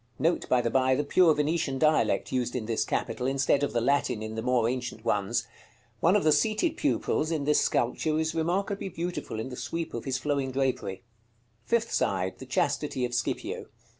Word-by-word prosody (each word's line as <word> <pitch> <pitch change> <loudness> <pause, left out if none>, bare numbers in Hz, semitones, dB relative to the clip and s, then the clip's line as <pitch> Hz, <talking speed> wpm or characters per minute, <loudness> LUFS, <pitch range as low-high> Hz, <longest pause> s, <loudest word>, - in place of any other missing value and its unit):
Note, 170 +2 0
by 125 - +4
the 115 -1 -1
by, 130 +1 +3
the 145 - 0
pure 160 +2 +4
Venetian 150 -2 0
dialect 155 +2 +2
used 125 -1 -1
in 120 -4 -2
this 115 0 0
capital, 125 - -2
instead 135 +1 +2
of 145 - 0
the 120 - +1
Latin 125 -2 +1
in 110 0 -5
the 110 - -3
more 125 -1 +2
ancient 125 -2 -4
ones. 115 +2 0 0.5
One 170 - +4
of 210 - +3
the 155 - +4
seated 215 - +2
pupils 290 - 0
in 160 -3 -1
this 150 +1 +3
sculpture 155 +6 0
is 160 0 0
remarkably 190 +5 -1
beautiful 170 -9 -4
in 115 - -4
the 125 - -7
sweep 165 +5 -4
of 115 - -5
his 130 -1 -1
flowing 140 -1 -1
drapery. 130 -7 -2 0.6
Fifth 230 -1 +1
side. 95 -1 0
The - - -9
chastity 125 - 0
of 120 - -5
Scipio. 120 -1 -2
135 Hz, 195 wpm, -28 LUFS, 120-160 Hz, 0.6 s, by